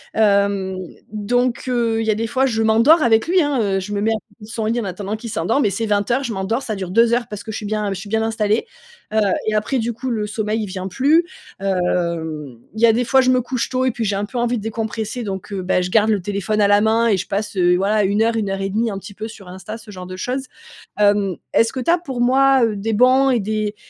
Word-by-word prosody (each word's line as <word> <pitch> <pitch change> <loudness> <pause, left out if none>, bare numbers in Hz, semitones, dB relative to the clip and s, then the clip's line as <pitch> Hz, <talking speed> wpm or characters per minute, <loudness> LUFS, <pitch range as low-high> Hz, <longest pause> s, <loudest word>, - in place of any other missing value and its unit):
Hem, 200 -3 +2 0.4
donc, 240 +4 0
heu, 230 -2 +1
il 220 - -3
y - - +1
a 210 - +3
des 225 +1 -2
fois, 260 +3 +1
je 225 -2 0
m'endors 230 +9 +5
avec 225 +3 +3
lui, 365 0 +4
hein, 285 -4 0
heu, 195 -2 0
je 205 +2 -6
me 200 - -1
mets 220 - +1
à 225 - +1
côté 220 0 -12
de - - -15
son 225 -1 -4
lit 230 +2 0
en - - -4
attendant 195 +3 -4
qu'il 230 +1 -7
s'endorme, 230 +4 0
et - - +3
c'est 225 +4 -2
20:00, 210 +6 +1
je 235 - -3
m'endors, 210 +7 -2
ça 215 - -3
dure 190 -2 -5
2 230 +4 +3
heures 240 -1 0
parce 210 -1 -7
que 220 - -6
je - - -4
suis 210 - -5
bien 210 -2 -1
je 190 - -6
suis 200 0 -9
bien 220 0 +1
installée. 220 - 0 0.5
Heu, 220 - +3 0.3
et 215 - +1
après 215 +5 0
du 235 0 -1
coup, 255 +3 -5
le 215 -3 -1
sommeil 215 +1 -2
il - - -2
vient 185 0 -5
plus. 295 - +3 0.3
Hem, 170 -7 -2 0.2
il 220 - -6
y 235 - +7
a - - +6
des 245 +1 0
fois, 265 +1 +4
je 255 - +2
me 255 - +3
couche 245 0 -3
tôt 255 0 0
et 255 - +2
puis 230 0 -4
j'ai 200 -1 0
un 205 +1 -1
peu 240 +3 -5
envie 240 0 0
de 210 - -6
décompresser 225 +1 -4
donc, 195 0 -6
heu, 195 -2 -3
beh, 180 0 +1
je 180 - -4
garde 220 0 +4
le 205 -4 +1
téléphone 205 +1 -2
à 200 - +5
la 205 0 +4
main 225 +2 +3
et 200 -4 +3
je 190 - -4
passe, 205 +1 -3
heu, 180 -1 +3
voilà, 205 +2 +2
1-1,5, 205 0 0
un 195 - -4
petit 205 - -11
peu 220 +3 -6
sur 200 -4 -12
Insta, 190 +5 -8
ce 210 -1 -13
genre 180 -1 -8
de 185 - -7
choses. 260 +6 -3 0.5
Hem, 205 -3 +3 0.2
est-ce 230 0 +3
que 260 - -4
tu 335 - +2
as 350 - +3
pour 265 -8 -6
moi, 265 +1 +4
heu, 215 -2 -1
des 220 +3 -2
bons 255 +4 +4
et 240 - +2
des 215 0 -2
220 Hz, 275 wpm, -20 LUFS, 200-235 Hz, 0.5 s, y